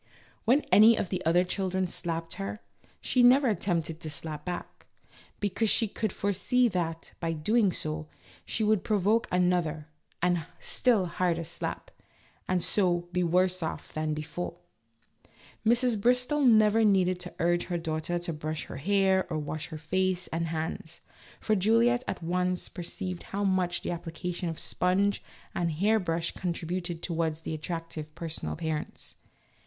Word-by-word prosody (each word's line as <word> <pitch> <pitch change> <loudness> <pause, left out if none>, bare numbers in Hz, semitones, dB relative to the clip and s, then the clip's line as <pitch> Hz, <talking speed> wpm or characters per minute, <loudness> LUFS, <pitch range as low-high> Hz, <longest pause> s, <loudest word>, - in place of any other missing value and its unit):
When 255 +6 +5
any 220 +2 +8
of 180 - -1
the 185 -1 -2
other 175 +2 +5
children 190 0 -1
slapped 165 -2 -3
her, 100 +1 -4 0.4
she 250 - +2
never 255 +3 +6
attempted 170 -6 -1
to 160 - -6
slap 150 0 -4
back, 180 -1 -6 0.5
because 205 +2 0
she 225 - +3
could 215 0 -2
fore 200 +2 -1
see 250 +6 +3
that, 165 -4 -3
by 165 -1 -1
so - - -5
doing, 210 +5 +3 0.7
she 220 - -2
would 215 -2 +2
provoke 215 +3 +2
another 175 -4 +1 0.3
and 175 -2 +1 0.2
still 230 -7 +2
harder 170 -1 0
slap, 170 +2 -5 0.6
and 180 -2 +1
so 175 -3 +1
be 180 - 0
worse 180 +2 +2
off 160 - -5
than 155 0 -1
before. 170 +3 -5 1.1
Mrs. 235 -1 +3
Bristol 250 +5 +2
never 220 -3 +5
needed 185 -3 +3
to 180 0 -7
urge 175 +1 +1
this 175 -2 -2
daughter 160 +2 -1
to 175 -1 -2
brush 155 +1 -4
her - - -8
hair 190 +3 +2
or 155 - 0
wash 155 0 -4
her 155 - -7
face 185 +3 0
and 165 +1 -1
hands, 160 +1 -4 0.4
for 215 - +1
Juliette 230 +5 +3
at - - -4
once 180 +1 0
perceived 180 0 -5
how 200 +1 -4
much 185 -3 +1
the - - -2
application 175 +1 -4
of 165 - -5
a - - -4
sponge 195 +3 +1 0.3
and 170 -1 0
hair 210 +7 +3
brush 170 -3 -1
contributed 175 -1 -3
towards 165 -2 -2
an - - -2
attractive 155 -1 -5
personal 165 -2 -4
appearance. 160 -2 -4
180 Hz, 155 wpm, -29 LUFS, 165-200 Hz, 1.1 s, any